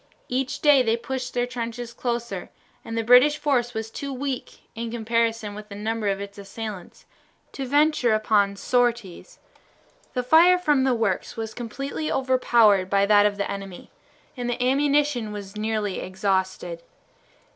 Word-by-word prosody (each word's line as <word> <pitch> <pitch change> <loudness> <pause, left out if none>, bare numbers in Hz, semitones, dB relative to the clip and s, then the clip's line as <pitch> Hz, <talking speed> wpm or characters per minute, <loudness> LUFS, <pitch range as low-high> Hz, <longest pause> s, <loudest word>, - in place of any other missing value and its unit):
Each 265 +3 -2
day 290 -3 +6
they 230 -2 +1
pushed 255 +1 -5
their 245 0 +1
trenches 240 -1 -5
closer, 235 -7 -4 0.3
and 230 - -5
the 225 - 0
British 250 +6 +6
force 250 -6 0
was 220 0 -4
too 280 +3 -5
weak, 265 -1 -5
in 230 0 -5
comparison 230 -2 -1
with 210 +1 -10
the 200 - -8
number 220 +1 -2
of 195 -1 0
its 200 0 -8
assailants, 200 -2 -8 0.5
to 270 -1 -5
venture 290 -4 +3
upon 205 -2 +2
sorties. 235 -4 -1 0.8
The 250 - 0
fire 335 +7 +6
from 295 -7 +2
the 260 -2 +2
works 220 -4 -2
was 225 -1 -4
completely 275 +6 -4
overpowered 235 -7 +3
by 200 0 +3
that 205 0 +5
of 205 -1 -4
the 200 - -2
enemy, 195 -2 -8 0.4
and 245 -2 -4
the 245 - -2
ammunition 280 -3 +1
was 200 -1 -8
nearly 215 -2 -2
exhausted. 185 -2 -2
230 Hz, 155 wpm, -24 LUFS, 205-255 Hz, 0.8 s, day